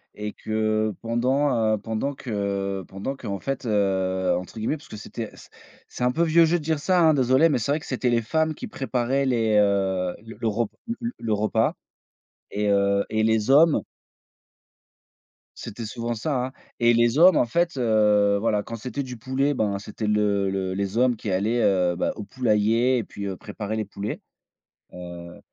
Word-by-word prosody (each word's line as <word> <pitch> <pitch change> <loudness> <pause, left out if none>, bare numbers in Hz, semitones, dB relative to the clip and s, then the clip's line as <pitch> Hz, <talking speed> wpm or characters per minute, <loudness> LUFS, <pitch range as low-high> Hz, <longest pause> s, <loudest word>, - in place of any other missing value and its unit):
et 105 0 -4
que 110 -1 -1
pendant, 120 -1 +1
heu, - - +1
pendant 110 +6 -3
que 100 -5 -3
pendant 100 +8 -5
qu'en 100 -1 -5
fait, 135 +3 -4
heu, 95 -3 +1
entre 90 +5 -8
guillemets, 115 +8 -1
puisque 140 -7 -11
c'était 110 +1 -6
c'est - - -15 0.4
c'est 125 - -5
un 125 - +3
peu 170 - +2
vieux 165 0 +5
jeu 175 +2 +2
de 155 - -7
dire 160 -1 0
ça 180 +3 +2
hein, 160 -1 +6
désolé, 130 +4 +4
mais 145 - +2
c'est 130 +6 -1
vrai 155 - 0
que - - -11
c'était 130 -1 -1
les 120 -1 +2
femmes 160 +6 0
qui - - -7
préparaient 135 +1 -1
les, 115 -4 +1
heu, 95 -3 +1
le 115 0 -5
re 110 +1 0 0.3
le 235 - -2
le 110 -2 -1
repas 105 +1 +1 0.8
et 105 0 -1
heu 100 0 +2
et 110 0 0
les 110 +1 +1
hommes 155 +3 +6 1.8
c'était 115 +2 -7
souvent 115 +2 -3
ça 125 +2 -1
hein? 130 - -9 0.3
Et 120 0 +5
les 120 +4 +3
hommes, 185 +2 +7
en - - +4
fait, 170 +4 0
heu, 105 -4 +3
voilà, 105 -1 0
quand 115 - -7
c'était 125 +4 -4
du 125 -2 -7
poulet, 130 +4 0
bah 105 -4 0
c'était 105 +2 -6
le 105 -2 +1
le 95 -1 -2
les 100 +3 -2
hommes 125 -2 +3
qui 105 -1 -5
allaient, 110 +6 +1
heu, 90 -3 +2
bah, - - 0
au 105 - -6
poulailler 115 +2 +2
et 115 - -2
puis, 100 0 -7
heu, 95 - -4
préparer 105 +2 -5
les 110 - -1
poulets. 100 +1 -5 0.7
Heu, 85 -1 -9
110 Hz, 190 wpm, -24 LUFS, 100-130 Hz, 1.8 s, hommes